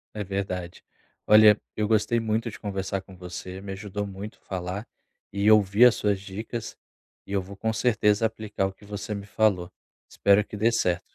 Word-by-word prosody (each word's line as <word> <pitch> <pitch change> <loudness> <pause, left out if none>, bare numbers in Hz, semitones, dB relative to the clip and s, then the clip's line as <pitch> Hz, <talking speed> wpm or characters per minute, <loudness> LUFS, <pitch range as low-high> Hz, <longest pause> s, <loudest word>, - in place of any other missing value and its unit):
É 105 - -3
verdade. 90 -2 -4 0.4
Olha, 105 -1 +7 0.2
eu 105 - 0
gostei 110 +2 +2
muito 115 +1 -1
de - - -11
conversar 95 -2 -3
com 95 - -15
você, 90 +1 -7
me 100 0 -7
ajudou 105 +1 -5
muito 100 +2 -8
falar 95 +3 -5 0.5
e 100 +2 +3
ouvir 105 +1 +6
as 125 - +7
suas 100 -2 0
dicas, 110 +4 -6 0.5
e - - -8
eu 100 -1 +1
vou 95 +2 -10
com 110 +3 -1
certeza 110 -2 +2
aplicar 110 -3 -1
o 95 - -4
que 95 - -20
você 105 +1 -5
me 100 -1 -6
falou. 100 -4 +1 0.4
Espero 100 +1 +3
que 105 - -9
dê 110 +3 +2
certo. 90 -6 +1
100 Hz, 185 wpm, -26 LUFS, 95-110 Hz, 0.5 s, Olha